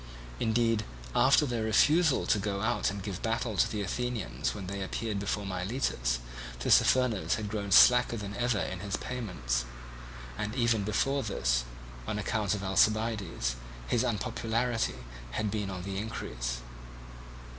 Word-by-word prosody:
Indeed 115 -1 +2 0.3
after 140 +3 +5
their 120 -4 -2
refusal 145 +8 +4
to 105 - +2
go 100 -1 -2
out 120 +2 +1
and 100 -1 -5
give 100 -4 -5
battle 115 -1 -1
to - - +3
the 105 -2 -2
Athenians 110 - -2
when 100 -3 -6
they 100 +1 -4
appeared 105 +2 -3
before 100 0 -2
Miletus, 90 - -1 0.4
Tissaphernes 120 - +3
had 110 -2 -4
grown 100 -2 -3
slacker 125 +3 +7
than 105 -1 -6
ever 120 -2 +1
in 95 -2 -3
his 100 0 -3
payments; 90 - -2 0.8
and 105 +2 -3
even 115 -4 +2
before 135 +7 +1
this, - - 0 0.4
on 105 - -2
account 105 -1 0
of 100 - -5
Alcibiades, 100 - +1 0.3
his 110 - +1
unpopularity 115 - -1 0.4
had 105 - -1
been 105 -2 -2
on 90 -2 -5
the 95 0 -3
increase. 60 - -4
105 Hz, 145 wpm, -30 LUFS, 95-115 Hz, 0.8 s, slacker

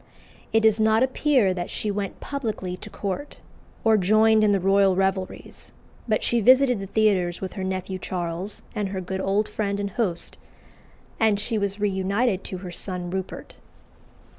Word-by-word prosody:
It 225 - +4
does 220 0 +4
not 220 +2 +4
appear 260 -6 +2
that 175 -1 -4
she 210 - -2
went 200 -1 -4
publicly 220 -10 -4
to - - -10
court, 200 +9 -5 0.5
or 220 -1 +5
joined 215 +3 +4
in 210 - +4
the 200 - +3
royal 195 0 +4
revelries; 190 0 -2 0.3
but 215 -2 +1
she 235 -1 +1
visited 255 0 +5
the 195 - -5
theatres 190 -5 +1
with 190 - -5
her 190 - -5
nephew 185 0 -3
Charles 180 +2 -4
and 210 -3 -2
her 190 -1 -3
good 190 +1 -4
old 200 +3 +1
friend 200 -2 -2
and 200 0 -3
host, 185 -6 -2 0.8
and 215 -2 +3
she 220 +1 -1
was 200 0 -2
reunited 200 +1 0
to 185 - -5
her 180 - -6
son 180 0 -4
Rupert. 190 0 -6
200 Hz, 165 wpm, -24 LUFS, 190-220 Hz, 0.8 s, or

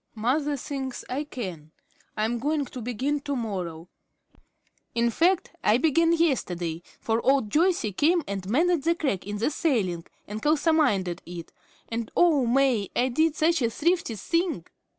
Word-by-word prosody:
Mother 280 +6 0
thinks 265 -1 -5
I 280 +4 -2
can. 185 - -6 0.5
I'm 225 +3 0
going 290 +3 0
to 255 -1 -8
begin 255 +5 -1
to 285 0 -3
morrow. 180 -8 -4 1.1
In 235 0 +2
fact, 345 - +2
I 220 - +4
began 325 +4 +3
yesterday, 180 - 0 0.2
for 225 +1 -1
old 265 -6 +2
Joyce 345 -2 +2
came 335 - +3
and 195 -1 -4
mended 330 +6 +2
the 335 +4 +2
crack 265 - -2
in 205 0 -3
the 230 +8 0
ceiling 205 - 0 0.2
and 210 +1 -5
kalsomined 300 - +2
it, 175 -1 -7 0.4
and 230 -1 -4
oh, 305 -8 +4
May, 245 -5 +2
I 255 +1 +2
did 315 +5 +2
such 325 0 +2
a 235 - +2
thrifty 330 -1 0
thing! 335 - -1
260 Hz, 150 wpm, -26 LUFS, 210-310 Hz, 1.1 s, I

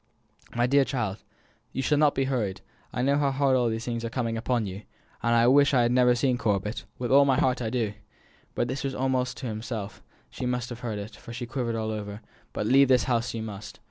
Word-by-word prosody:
"My 120 0 +3
dear 140 +2 +4
child, 115 -8 -2 0.6
you 135 - -2
shall 150 +1 +2
not 150 -1 +4
be 135 - +1
hurried 115 -8 -2 0.3
I 125 - -2
know 140 +2 +3
how 140 -1 +2
hardly 135 -1 +2
all 120 -1 +2
these 115 0 -3
things 115 -1 -3
are 115 - -2
coming 115 -1 -2
upon 115 0 0
you 95 +1 -6 0.4
(and 120 0 +2
I 115 0 +5
wish 140 +2 +5
I 125 - +5
had 120 - +2
never 125 -1 +4
seen 125 0 +1
Corbet, 105 -1 -1
with 125 -1 -3
all 140 +1 +7
my 135 -2 +2
heart 125 -1 +1
I 115 - -1
do!)" 115 -4 -1 0.6
this 130 +3 -1
was 135 -1 -2
almost 130 -1 0
to - - -6
himself, 110 -2 -5 0.3
but - - -20
she 125 - -2
must 125 -1 -2
have 120 -1 -7
heard 115 -4 -4
it, 105 +1 -7
for 115 - -10
she 120 +1 -4
quivered 120 -2 -2
all 110 -1 -2
over 105 0 -5 0.3
"but - - -3
leave 135 +4 +5
this 125 -1 +4
house 120 -2 0
you 110 - -3
must. 105 -1 -8
120 Hz, 235 wpm, -27 LUFS, 110-130 Hz, 0.6 s, all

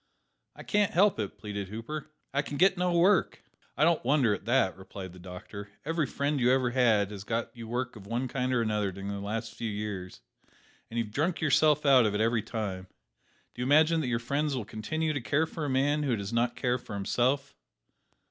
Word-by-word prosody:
"I - - -10
can't 205 -2 +1
help 195 - +4
it," 105 -3 -4
pleaded 100 -2 -5
Hooper; 115 +10 -6 0.3
"I 140 - +2
can 145 0 -6
get 190 +3 +5
no 180 0 0
work." 185 +3 +3 0.3
"I - - +3
don't 165 0 +3
wonder 130 -4 +3
at 100 - -6
that," 120 -5 +2
replied 95 -1 -9
the 90 - -13
doctor; 95 +3 -9 0.2
every 165 -2 0
friend 140 +2 -1
you 125 0 +4
ever 130 -2 +2
had 110 -5 +3
has 100 -2 -7
got 115 +3 -3
you 115 -1 -8
work 125 +2 -3
of 100 -2 -11
one 120 +4 -1
kind 125 0 -1
or 120 -2 +2
another 105 -3 0
during 100 +2 -6
the 100 0 -4
last 110 +3 -4
few 115 - -4
years, 100 - -5 0.7
and 115 - -6
you 115 - +2
have 105 - -14
drunk 165 +6 0
yourself 150 0 +3
out 130 -5 +6
of 105 - -1
it - - 0
every 115 0 +2
time. 100 -4 -4 0.7
Do 120 - -7
you 125 - -1
imagine 160 +3 +5
that 140 - -2
your 120 -1 +1
friends 140 +4 -1
will 120 -5 -3
continue 155 +9 -2
to 145 - -2
care 150 +6 +1
for 160 -1 -5
a - - -2
man 140 +3 +2
who 135 -5 +1
cares 100 +2 -5
not 120 +1 0
for 125 -4 -1
himself? 130 +8 0
120 Hz, 215 wpm, -29 LUFS, 105-145 Hz, 0.7 s, out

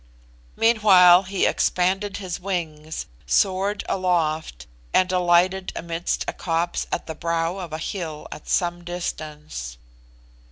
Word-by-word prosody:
Meanwhile 195 -6 +6
he 195 -1 +1
expanded 195 +3 +1
his 185 -3 -5
wings, 160 -5 -4 0.2
soared 195 +1 +1
aloft, 160 - -1 0.3
and 185 0 +4
alighted 180 +1 +2
amidst 170 0 -2
a - - -2
copse 170 0 -1
at - - -2
the 160 - -5
brow 165 +2 -1
of 175 -4 -6
a 155 - -3
hill 160 -3 -5
at - - -9
some 175 -1 0
distance. 150 - -6
175 Hz, 120 wpm, -23 LUFS, 160-185 Hz, 0.3 s, Meanwhile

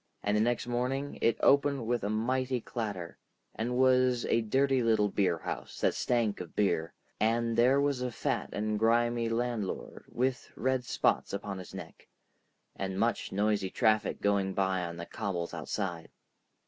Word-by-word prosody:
And 105 +1 +1
the 105 - +3
next 120 +1 +1
morning 125 +4 -2
it 115 - +3
opened 140 -3 +3
with 120 -1 0
a 100 - -1
mighty 125 +4 0
clatter, 105 -7 -5 0.3
and 120 +2 -2
was 130 -1 +4
a 115 - +2
dirty 135 +4 +2
little 110 -3 +3
beerhouse 90 -5 -2
that - - +3
stank 115 -5 0
of 85 - -9
beer, 85 -5 0 0.2
and 115 +1 +1
there 125 +4 +4
was 140 -2 +1
a 125 - -1
fat - - -2
and 105 +1 -1
grimy 115 +1 +2
landlord 115 -3 -3
with 125 0 -1
red 130 -1 0
spots - - +1
upon 100 -1 -4
his 90 - -10
neck, - - -10 0.7
and 95 0 -3
much 115 +1 0
noisy 100 -1 +1
traffic 110 +2 +1
going 100 -1 +1
by 95 -1 +1
on 85 0 -6
the 85 - -5
cobbles 90 -5 -4
outside. 90 -5 -4
115 Hz, 160 wpm, -30 LUFS, 100-125 Hz, 0.7 s, was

